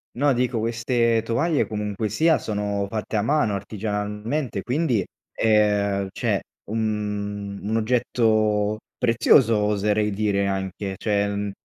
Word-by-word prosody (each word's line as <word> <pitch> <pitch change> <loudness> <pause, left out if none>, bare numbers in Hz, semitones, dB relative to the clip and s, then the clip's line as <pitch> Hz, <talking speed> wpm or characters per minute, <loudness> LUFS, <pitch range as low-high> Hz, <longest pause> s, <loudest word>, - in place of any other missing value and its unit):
No, 140 +3 +3
dico 125 0 0
queste 115 0 +1
tovaglie 145 +8 +1
comunque 105 0 -3
sia 160 +9 +3
sono 100 -1 -2
fatte 110 +1 -3
a - - +2
mano 115 -2 +1
artigianalmente, 105 +4 -3
quindi, 125 - 0 0.3
ehm, 105 -2 +2
cioè - - -1 0.3
un 105 -2 -3
un 110 +2 -1
oggetto 110 -3 +1 0.2
prezioso 115 +1 +4
oserei 105 0 +1
dire 100 -1 0
anche, 95 0 -3
cioè, 100 0 0
mhmm, 100 0 -2
105 Hz, 120 wpm, -23 LUFS, 100-115 Hz, 0.3 s, prezioso